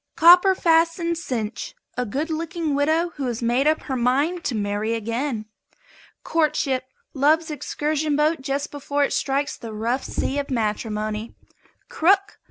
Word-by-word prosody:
COPPER 360 +3 +7
FASTENED 335 0 +2
CINCH. 240 -9 -4 0.2
A 250 -1 -2
good 295 +10 -2
looking 330 -1 -2
widow 315 +5 +2
who 275 -3 -2
has 240 -1 -3
made 245 +5 +2
up 310 +1 +2
her 265 - -3
mind 280 +8 +1
to 245 - -1
marry 210 +2 -1
again. 230 +1 -2 0.8
COURTSHIP. 280 -5 0 0.3
Love's 310 +4 +2
excursion 300 +1 -1
boat 300 0 +2
just 275 +1 -2
before 285 0 -1
it - - 0
strikes 280 +1 0
the 230 -2 -8
rough 235 +5 -1
sea 280 +2 -2
of 280 - -4
matrimony. 215 -2 -2 0.5
CROOK. 390 +5 +2
285 Hz, 145 wpm, -23 LUFS, 240-320 Hz, 0.8 s, COPPER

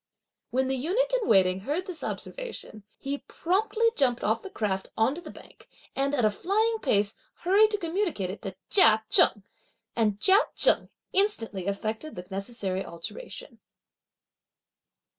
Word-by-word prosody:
'" - - -61
When 260 +2 0
the 265 - 0
eunuch 395 - 0
in - - 0
waiting 185 -1 +4
heard 295 - -3
this 365 -5 -7
observation, 475 - -6
he 280 +1 -4
promptly 420 +6 -1
jumped 250 -4 +1
off 220 +2 +1
the 390 - -8
craft 195 - -2
on 225 +4 +3
to 340 - -8
the - - -10
bank, - - -15 0.3
and 275 +1 0
at 245 -5 +2
a 215 - +3
flying 435 - 0
pace 205 -5 +1 0.3
hurried 400 +5 +4
to 420 - -1
communicate 335 - -2
it 200 - -9
to 195 -3 -6 0.2
Chia 220 - +5
Cheng, 205 - +5 0.5
and 210 -3 +1
Chia 385 - +7 0.2
Cheng - - +4 0.2
instantly 225 - +1
effected 220 +8 -3
the 180 0 -7
necessary 195 -1 -3
alteration. 485 - -8
265 Hz, 155 wpm, -27 LUFS, -, 0.5 s, Chia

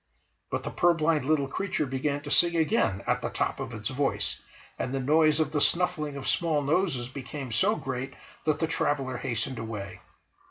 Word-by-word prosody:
But - - -2
the - - -4
purblind 165 -4 +2
little 145 -2 +2
creature 180 +1 -1
began 140 +2 -1
to 145 - -6
sing 170 -1 +5
again 160 - +2
at - - +1
the - - -2
top - - -1
of - - -4
its 110 -2 -4
voice, 135 +1 -1 0.4
and 125 - -2
the 135 - -1
noise 155 +3 +4
of 155 -2 +1
the 150 -2 0
snuffling 170 -5 +2
of 135 - -5
small 160 -4 +1
noses 145 -5 +1
became 135 0 -7
so 195 - +3
great 130 - -4 0.3
that 155 -1 +2
the 160 - +1
traveller 140 -5 -1
hastened 120 +1 -2
away. 105 -4 -6
145 Hz, 185 wpm, -28 LUFS, 130-160 Hz, 0.4 s, sing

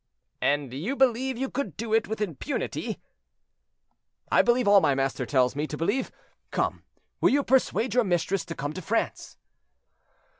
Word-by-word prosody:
"And 140 -3 0
you 185 - -3
believe 260 -1 +2
you 265 +2 -1
could 240 - -4
do 225 0 -3
it 225 0 +3
with 220 +1 -4
impunity?" 210 - -3 1.3
"I - - +6
believe 240 -1 +2
all 200 -1 +7
my 140 - +3
master 135 -2 -1
tells 130 -1 +2
me 150 +2 -2
to 150 - -5
believe. 205 - -1 0.4
Come, - - -1 0.4
will - - +4
you 285 +1 +2
persuade 255 -3 +2
your 245 0 +4
mistress 180 -1 0
to 165 - -6
come 145 +2 -4
to 185 - -6
France?" 225 +6 -2
205 Hz, 160 wpm, -27 LUFS, 150-245 Hz, 1.3 s, all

